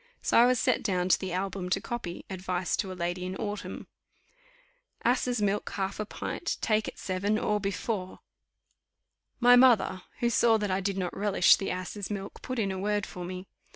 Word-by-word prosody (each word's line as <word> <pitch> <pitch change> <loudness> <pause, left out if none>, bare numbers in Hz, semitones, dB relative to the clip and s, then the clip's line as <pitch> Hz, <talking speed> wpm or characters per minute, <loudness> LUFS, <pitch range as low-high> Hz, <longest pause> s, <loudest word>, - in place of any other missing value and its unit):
So - - +4
I 240 - +7
was 250 -1 +3
set - - +2
down 185 -3 0
to - - +5
the 190 - -4
album 185 0 -3
to - - +1
copy 230 -8 -5
Advice 185 -2 -2
to 195 -3 -2
a 185 - -7
Lady 175 +1 -2
in 185 +1 -4
Autumn. 205 0 -5 1.2
"Asses' 245 -2 +1
milk, 205 +1 0
half 195 0 -2
a 215 - -3
pint, 345 - -4
take 215 -1 +1
at - - -7
seven, 195 +3 -1
or 210 -1 0
before." 195 -1 -3 1.2
My 245 0 +7
mother, 240 -7 +5 0.2
who 240 0 +1
saw 230 -1 +4
that 205 -2 -2
I 185 - +1
did 195 0 -2
not 180 -2 -2
relish 200 -2 +5
the 195 - -4
asses' 185 +2 -4
milk, 200 -2 -6
put 255 - -4
in 200 -4 0
a 190 - -4
word 205 0 0
for 180 - -8
me. 185 +1 -6
195 Hz, 190 wpm, -29 LUFS, 185-215 Hz, 1.2 s, I